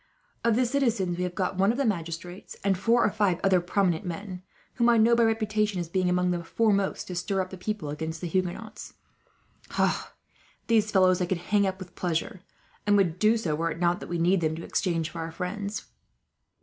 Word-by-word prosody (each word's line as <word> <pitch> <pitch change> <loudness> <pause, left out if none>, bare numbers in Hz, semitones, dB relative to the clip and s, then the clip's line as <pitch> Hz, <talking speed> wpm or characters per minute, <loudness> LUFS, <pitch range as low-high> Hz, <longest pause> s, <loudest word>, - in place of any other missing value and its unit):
"Of 230 -2 +3
the 250 +2 +3
citizens 235 -9 0
we 180 - -2
have 180 -1 -5
got 185 0 -2
one 195 +3 +4
of 240 - -3
the 280 - +1
magistrates, 175 -2 -4
and 195 -1 +2
four 230 +5 +3
or - - +2
five 200 -5 +1
other 190 -2 +4
prominent 180 0 +1
men; 180 +1 -6 0.3
whom 240 -1 +3
I 235 - +5
know, 230 +2 +5
by 235 - +3
reputation, 215 -3 +1
as 175 - -2
having 185 +2 0
been - - +2
among 180 0 +2
the 175 -1 -2
foremost 200 +1 +1
to 180 - -6
stir 195 +2 -1
up 185 -1 -2
the - - -6
people 195 -5 -3
against 160 +2 -4
the 175 - -4
Huguenots. 185 +5 -3 1.7
These 220 -2 +3
fellows 185 -2 +4
I 180 - 0
could 185 - 0 0.2
hang 200 -1 +4
up 190 0 -2
with 185 -2 -10
pleasure, 175 +3 -2 0.5
and 205 0 +5
would 180 -3 +1
do 220 +2 +4
so, 175 -9 -1
were 165 +2 0
it 165 - -5
not 175 0 +2
that - - -9
we 175 - -1
need 175 +2 +2
them 160 -1 0
to 165 - -7
exchange 165 -4 -1
for 165 - -6
our 165 0 -5
friends. 200 +4 -4
185 Hz, 215 wpm, -27 LUFS, 175-215 Hz, 1.7 s, I